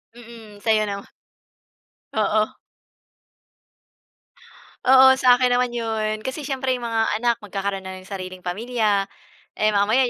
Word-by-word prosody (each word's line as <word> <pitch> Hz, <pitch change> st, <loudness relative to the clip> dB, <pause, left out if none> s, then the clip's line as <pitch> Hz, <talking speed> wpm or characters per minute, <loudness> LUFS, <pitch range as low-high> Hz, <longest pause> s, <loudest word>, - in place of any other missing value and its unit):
Mm. 225 Hz, -3 st, -13 dB
Sa'yo 215 Hz, 0 st, +2 dB
naman. 200 Hz, -1 st, -6 dB, 1.0 s
Oo. 215 Hz, 0 st, +1 dB, 2.3 s
Oo, 265 Hz, 0 st, +8 dB
sa 255 Hz, -2 st, +5 dB
akin 250 Hz, -1 st, +2 dB
naman 250 Hz, 0 st, +2 dB
'yon. 220 Hz, -2 st, -3 dB
Kasi 260 Hz, +4 st, -4 dB
syempre, 265 Hz, -2 st, -1 dB
yung 250 Hz, -, -4 dB
mga 225 Hz, -1 st, +1 dB, 0.2 s
anak 235 Hz, -1 st, +2 dB
magkakaroon 195 Hz, -2 st, -4 dB
na 190 Hz, 0 st, -7 dB
ng 185 Hz, -, -17 dB
sariling 185 Hz, -1 st, -7 dB
pamilya, 205 Hz, +1 st, 0 dB, 0.5 s
eh, 215 Hz, -, +1 dB
mamaya 215 Hz, +5 st, +2 dB
220 Hz, 125 wpm, -22 LUFS, 205-245 Hz, 2.3 s, Oo